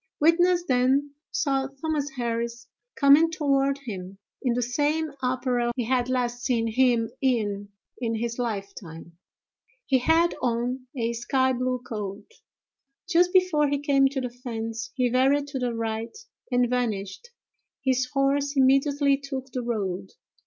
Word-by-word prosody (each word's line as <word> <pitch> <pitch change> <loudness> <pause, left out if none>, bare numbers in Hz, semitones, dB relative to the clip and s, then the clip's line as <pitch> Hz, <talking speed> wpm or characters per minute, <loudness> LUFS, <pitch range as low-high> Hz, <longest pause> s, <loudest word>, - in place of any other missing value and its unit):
Witness 345 +3 +4
then 265 +3 +2 0.2
saw 275 -4 0
Thomas 300 -2 -1
Harris 235 0 -3 0.3
coming 285 +4 +6
toward 275 -3 +1
him, 195 -4 -7 0.2
in 245 -3 +1
the 245 - 0
same 295 +5 0
apparel 250 -1 0
he 250 - -1
had 250 +1 0
last 245 -1 -1
seen 235 -3 +1
him 230 -1 +2
in 205 -6 0 0.3
in 230 -2 -1
his 235 +2 -3
lifetime; 195 -7 -5 0.7
he 265 -2 +3
had 325 +6 +3
on 250 +1 -1
a 235 -1 0
sky 260 +3 +1
blue 250 0 -2
coat. 205 -4 -5 0.8
Just 355 0 +3
before 360 -6 +3
he 285 - +1
came 275 -1 +3
to 270 0 -3
the 250 -1 -4
fence, 230 -1 -5
he 255 -2 +2
varied 265 +4 +3
to 275 -2 -4
the 245 -2 -1
right 225 - -3 0.3
and 245 0 +3
vanished; 225 - -2 0.6
his 260 -1 +2
horse 280 +1 +1
immediately 275 +1 +3
took 270 -1 -6
the 250 - -3
road. 195 -5 -3
255 Hz, 140 wpm, -26 LUFS, 235-280 Hz, 0.8 s, coming